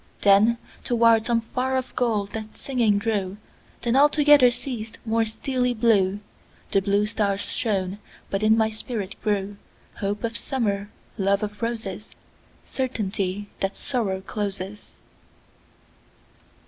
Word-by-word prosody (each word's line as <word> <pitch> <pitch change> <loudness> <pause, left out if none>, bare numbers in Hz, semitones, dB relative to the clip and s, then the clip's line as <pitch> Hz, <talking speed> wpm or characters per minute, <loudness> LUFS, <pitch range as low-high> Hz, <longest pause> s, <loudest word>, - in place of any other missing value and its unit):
Then 210 +4 +5 0.3
toward 230 -2 +4
some 235 -1 +2
far 255 +3 -1
off 255 - -4
goal 225 -5 +1
that 220 -1 -6
singing 235 -6 +1
drew; 205 -3 -1 0.5
Then 235 +1 +1
altogether 290 -2 +6
ceas'd; 240 -2 -4
more 225 0 +2
steely 250 +2 -1
blueThe 205 -3 0
blue 200 +1 +2
stars 205 -2 0
shone; 195 -4 -1 0.3
but 195 - 0
in 215 +1 +4
my 220 -1 +2
spirit 215 -3 -4
grewHope 205 0 -4
of 230 0 -2
Summer, 210 -5 -1 0.3
love 195 +1 +2
of 210 0 -5
Roses, 220 -3 -4 0.5
Certainty 205 -6 -2
that 195 0 -1
Sorrow 205 -8 -1
closes. 200 0 -5
215 Hz, 115 wpm, -24 LUFS, 200-235 Hz, 0.5 s, altogether